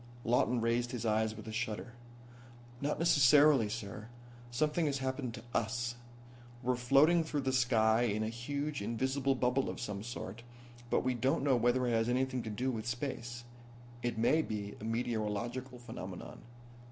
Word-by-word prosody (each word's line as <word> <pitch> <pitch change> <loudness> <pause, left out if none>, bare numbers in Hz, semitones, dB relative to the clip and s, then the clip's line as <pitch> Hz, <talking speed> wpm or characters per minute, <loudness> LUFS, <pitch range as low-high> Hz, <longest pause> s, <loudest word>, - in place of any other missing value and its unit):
Lawton 120 +1 +2
raised 120 +1 +1
his 120 -2 -3
eyes 110 0 +1
with 110 0 -10
a - - -4
shudder. 115 +1 -3 0.9
"Not 145 +1 0
necessarily, 145 -6 +5
sir. 105 -1 -6 0.4
Something 150 +6 +1
has 140 -1 0
happened 130 -2 -3
to - - -10
us. 120 +2 0 0.7
We're 125 +1 +2
floating 140 +7 +4
through 150 -2 -2
the 130 -1 -1
sky 115 -3 +3
in 110 -2 +1
a 110 - -1
huge, 140 +5 -3
invisible 130 +5 0
bubble 125 +1 +1
of - - -5
some 105 -4 -4
sort, 115 -1 -6 0.5
but - - +2
we 130 0 +1
don't 130 +3 +1
know 140 -2 +4
whether 120 +2 +2
it 120 - +1
has 115 0 +2
anything 130 0 0
to 115 - -5
do 125 +5 -1
with 110 -1 -4
space. 120 -1 -4 0.6
It 120 -2 -2
may 120 +8 +4
be 105 -6 -4
a - - -8
meteorological 120 +2 -2
phenomenon." 110 -7 -8
120 Hz, 165 wpm, -33 LUFS, 110-130 Hz, 0.9 s, necessarily